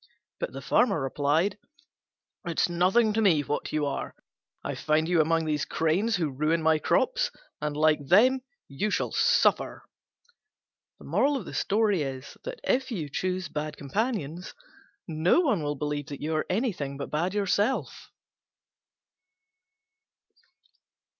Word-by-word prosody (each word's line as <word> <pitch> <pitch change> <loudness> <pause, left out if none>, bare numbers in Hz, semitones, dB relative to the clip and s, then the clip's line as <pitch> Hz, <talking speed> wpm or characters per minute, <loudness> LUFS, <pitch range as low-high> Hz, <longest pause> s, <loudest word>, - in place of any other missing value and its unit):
But - - -3
the - - -8
Farmer 200 -9 +3
replied, 150 +8 0 0.8
"It's 170 +1 0
nothing 185 +6 +3
to 225 - +1
me 175 -8 +4
what 145 +1 -3
you 155 -1 0
are: 140 - -4 0.5
I - - -3
find 155 +1 +1
you 175 -2 +4
among 165 +1 +1
these 150 -2 0
cranes, 185 +8 +1
who 165 -5 -1
ruin 155 +4 0
my 160 -1 +4
crops, - - +1 0.3
and, 150 -1 -2
like 150 -2 +2
them, 255 - +5 0.3
you 145 +10 -2
shall - - -1
suffer." - - +2 1.2
If 220 - -1
you 165 -10 -3
choose 185 +4 -2
bad 155 0 -5
companions 180 - -3 0.5
no 165 - +3
one 265 - +1
will 145 0 -2
believe 145 -1 -3
that 140 - -7
you 155 +2 -2
are 155 - -1
anything 180 - -1
but 140 - -6
bad 175 +6 -1
yourself. 205 +4 0
165 Hz, 120 wpm, -27 LUFS, 150-210 Hz, 1.2 s, them